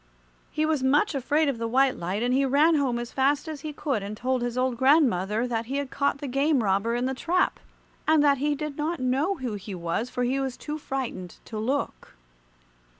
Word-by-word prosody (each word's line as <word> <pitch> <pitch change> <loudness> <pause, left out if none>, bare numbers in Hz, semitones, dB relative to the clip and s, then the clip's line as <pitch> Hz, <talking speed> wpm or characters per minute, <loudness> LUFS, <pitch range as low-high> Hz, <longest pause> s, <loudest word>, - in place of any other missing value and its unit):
He 310 - 0
was 310 -3 0
much 290 +9 +3
afraid 290 +3 +1
of 270 -5 -1
the 230 - -1
white 265 +2 +3
light, 185 +6 -3
and 245 +1 +1
he 270 +2 +3
ran 285 +5 +4
home 275 -6 +1
as 240 0 -5
fast 280 +3 +1
as 310 -3 -6
he 310 - -5
could 280 -6 -2
and 205 +2 -6
told 255 +1 -1
his 240 0 -3
old 255 -1 +1
grandmother 235 - +3
that 230 -2 -2
he 270 +3 -2
had 280 -2 -3
caught 280 0 0
the 285 - -6
game 275 0 +2
robber 200 +4 +1
in 245 +1 0
the 265 - -1
trap, 350 +7 0 0.5
and 310 -1 +5
that 280 -2 +4
he 295 +1 +1
did 300 -1 -5
not 315 +3 -2
know 270 +9 +1
who 255 - -4
he 200 -1 -6
was, 175 +7 -2
for 250 -1 -2
he 260 +3 0
was 265 -2 -3
too 300 +1 -5
frightened 250 - -5
to 220 - -6
look. 265 - -3
265 Hz, 220 wpm, -26 LUFS, 235-290 Hz, 0.5 s, and